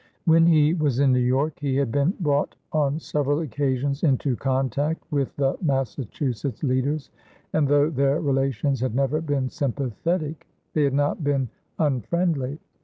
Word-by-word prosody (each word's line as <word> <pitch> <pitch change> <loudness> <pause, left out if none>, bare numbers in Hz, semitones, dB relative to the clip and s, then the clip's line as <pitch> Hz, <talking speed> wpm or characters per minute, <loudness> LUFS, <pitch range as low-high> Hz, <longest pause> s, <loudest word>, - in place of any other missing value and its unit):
When 165 0 +5
he 155 -2 +5
was 150 -7 0
in 140 -2 +4
New 125 - +3
York, 130 +5 +1
he 140 -3 -1
had 135 -4 +1
been 145 - +1
brought 145 -5 0 0.2
on 150 -1 +1
several 145 -1 0
occasions 140 0 -1
into 135 -3 +2
contact 135 +5 -1
with 140 -3 -1
the 135 -1 0
Massachusetts 135 - -2
leaders, 140 +2 0 0.4
and 155 -3 +2
though 145 +1 +4
their 140 0 +2
relations 135 -1 0
had 125 -2 -1
never 140 +3 +1
been 145 -4 -1
sympathetic, 150 - -2 0.3
they 150 -2 +3
had 135 -1 0
not 145 +2 0
been 140 -4 0 0.3
unfriendly. 145 - 0
140 Hz, 150 wpm, -24 LUFS, 135-150 Hz, 0.4 s, When